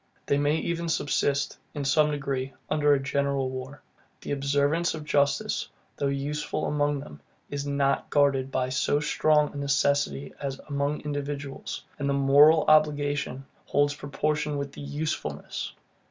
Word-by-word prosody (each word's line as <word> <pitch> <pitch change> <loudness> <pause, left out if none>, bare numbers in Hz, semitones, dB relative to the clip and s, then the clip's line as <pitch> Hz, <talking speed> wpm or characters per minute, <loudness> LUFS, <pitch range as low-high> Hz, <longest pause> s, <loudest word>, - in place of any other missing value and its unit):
They 140 - +2
may 145 +1 +2
even 170 +1 -2
subsist, 145 -2 0 0.2
in 145 -1 -3
some 150 +3 +4
degree, 135 -2 -2 0.2
under 150 -1 +3
a - - 0
general 135 -1 0
war. 130 +2 -7 0.4
The - - -6
observance 145 +4 +1
of 155 -1 -7
justice, 140 -1 +1 0.3
though 140 - 0
useful 140 +2 -2
among 145 -1 +1
them, 75 - -11 0.3
is 145 0 -3
not 140 -1 +1
guarded 140 -2 +2
by 130 -1 0
so 130 +3 +1
strong 150 0 +2
a - - -7
necessity 140 - +1
as 135 -2 -3
among 140 0 -1
individuals; 145 -1 -5 0.2
and 140 -1 -1
the 140 - +2
moral 145 +3 +6
obligation 145 -3 +2 0.2
holds 145 0 +2
proportion 150 +1 -2
with 140 0 -4
the - - -10
USEFULNESS. 150 +2 -4
145 Hz, 145 wpm, -27 LUFS, 140-150 Hz, 0.4 s, moral